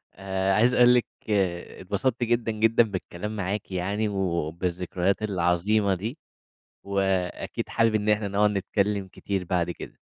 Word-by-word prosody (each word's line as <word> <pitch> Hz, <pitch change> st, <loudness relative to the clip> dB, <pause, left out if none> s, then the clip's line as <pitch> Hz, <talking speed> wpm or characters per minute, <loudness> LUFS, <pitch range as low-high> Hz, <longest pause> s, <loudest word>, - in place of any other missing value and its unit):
آآ 95 Hz, 0 st, -1 dB
عايز 120 Hz, +4 st, +4 dB
اقول 125 Hz, 0 st, +6 dB
لِك 120 Hz, -, +2 dB, 0.2 s
اتبسطت 100 Hz, +5 st, -1 dB
جدًا 120 Hz, -1 st, +1 dB
جدًا 115 Hz, +2 st, +4 dB
بالكلام 105 Hz, 0 st, -5 dB
معاكِ 100 Hz, 0 st, -3 dB
يعني، 100 Hz, +4 st, -1 dB
وبالذكريات 90 Hz, +1 st, -1 dB
العظيمة 100 Hz, +2 st, +1 dB
دي، 110 Hz, -, -5 dB, 0.7 s
وأكيد 95 Hz, -2 st, -1 dB
حابب 115 Hz, -1 st, +2 dB
إن 105 Hz, 0 st, 0 dB
إحنا 105 Hz, -1 st, +2 dB
نقعد 105 Hz, +1 st, +3 dB
نتكلّم 100 Hz, 0 st, -1 dB
كتير 95 Hz, 0 st, -4 dB
بعد 90 Hz, -1 st, 0 dB
كده. -, -, -9 dB
100 Hz, 130 wpm, -26 LUFS, 90-110 Hz, 0.7 s, اقول